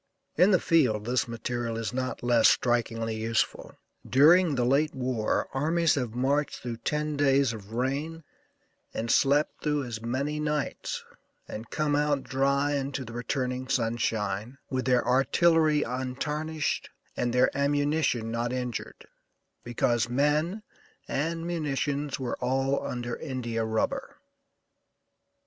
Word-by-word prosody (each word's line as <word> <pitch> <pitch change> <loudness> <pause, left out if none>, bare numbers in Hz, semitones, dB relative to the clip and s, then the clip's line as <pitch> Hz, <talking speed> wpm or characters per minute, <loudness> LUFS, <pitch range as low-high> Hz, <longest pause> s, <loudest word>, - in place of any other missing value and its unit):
In 180 +5 +5
the 185 -4 +5
field 125 -11 +2
this 125 0 0
material 115 0 -3
is 115 +1 -3
not 130 -1 -3
less 120 -2 +5
strikingly 115 -2 +1
useful. 110 0 -1 0.3
During 155 +4 +5
the 125 -2 +1
late 145 +5 +2
war 125 -4 -1
armies 165 +4 +2
have 125 -5 -2
marched 140 +4 0
through 120 -2 -5
ten 150 +5 -2
days 140 -3 +3
of 105 -1 -10
rain 140 +7 -2 0.7
and 115 +1 -1
slept 145 +4 +2
through 150 -2 0
as 115 -3 -6
many 140 +6 -2
nights, 150 -1 -2 0.4
and 110 +1 -7
come 150 -1 0
out 145 -1 +1
dry 140 +2 +1
into 135 -1 -2
the 115 - -9
returning 125 +1 -2
sunshine 115 -1 -1
with 130 -1 -1
their 125 -2 +2
artillery 155 +4 +3
untarnished 150 +5 -2 0.3
and 120 - 0
their 125 +2 +3
ammunition 145 -4 +1
not 120 +1 -1
injured, 125 -2 -4 0.6
because 120 -1 0
men 150 - +1 0.4
and 165 +3 -2
munitions 145 -4 -2
were 125 -3 -3
all 135 +2 0
under 120 -1 -4
India 120 -5 -3
rubber." 110 0 -2
130 Hz, 125 wpm, -28 LUFS, 120-150 Hz, 0.7 s, In